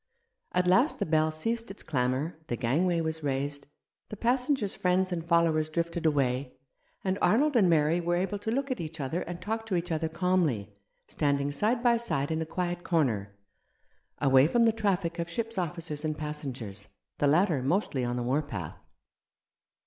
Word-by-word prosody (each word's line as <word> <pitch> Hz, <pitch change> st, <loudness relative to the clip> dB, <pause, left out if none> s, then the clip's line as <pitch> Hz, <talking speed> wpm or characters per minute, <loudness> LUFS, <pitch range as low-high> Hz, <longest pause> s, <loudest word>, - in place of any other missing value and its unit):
At 180 Hz, 0 st, +2 dB
last 190 Hz, -, +4 dB
the -, -, -1 dB
bell 155 Hz, 0 st, +2 dB
ceased 225 Hz, +9 st, -1 dB
its 195 Hz, -, -8 dB
clamour, 135 Hz, +3 st, -1 dB
the 120 Hz, -, -1 dB
gangway 165 Hz, +9 st, +1 dB
was 160 Hz, 0 st, -3 dB
raised, 140 Hz, 0 st, -2 dB, 0.4 s
the 210 Hz, -, -7 dB
passengers' 250 Hz, -2 st, +1 dB
friends 185 Hz, +1 st, +1 dB
and 170 Hz, -2 st, -2 dB
followers 165 Hz, -2 st, +2 dB
drifted 170 Hz, +1 st, -1 dB
away, 135 Hz, -3 st, 0 dB, 0.5 s
and 190 Hz, 0 st, -1 dB
Arnold 285 Hz, +6 st, +3 dB
and 200 Hz, -7 st, +5 dB
Mary 160 Hz, +1 st, +3 dB
were 175 Hz, +1 st, 0 dB
able 195 Hz, +3 st, -1 dB
to 220 Hz, -, -4 dB
look 275 Hz, +4 st, -1 dB
at 255 Hz, -, -2 dB
each 160 Hz, 0 st, -7 dB
other 140 Hz, +5 st, -2 dB
and 175 Hz, -1 st, -6 dB
talk 225 Hz, +4 st, -3 dB
to 195 Hz, -, 0 dB
each 175 Hz, 0 st, -2 dB
other 160 Hz, 0 st, 0 dB
calmly, 160 Hz, -, 0 dB, 0.3 s
standing 140 Hz, -1 st, 0 dB
side 220 Hz, -, 0 dB
by 240 Hz, -1 st, +5 dB
side 145 Hz, -11 st, -1 dB
in 160 Hz, 0 st, -1 dB
a 160 Hz, -, -3 dB
quiet 175 Hz, 0 st, -3 dB
corner, 110 Hz, -, 0 dB, 0.8 s
away 135 Hz, 0 st, +5 dB
from 235 Hz, +7 st, +3 dB
the 225 Hz, -, +5 dB
traffic 195 Hz, -6 st, -1 dB
of 170 Hz, 0 st, -2 dB
ship's 225 Hz, +3 st, -3 dB
officers 165 Hz, -3 st, -3 dB
and 155 Hz, -1 st, -2 dB
passengers, 130 Hz, -9 st, -5 dB, 0.3 s
the 145 Hz, -, +3 dB
latter 160 Hz, -1 st, +3 dB
mostly 140 Hz, -2 st, 0 dB
on 120 Hz, 0 st, -1 dB
the 120 Hz, -, -2 dB
war 130 Hz, +5 st, +1 dB
path. 110 Hz, -, -6 dB
165 Hz, 180 wpm, -29 LUFS, 145-190 Hz, 0.8 s, and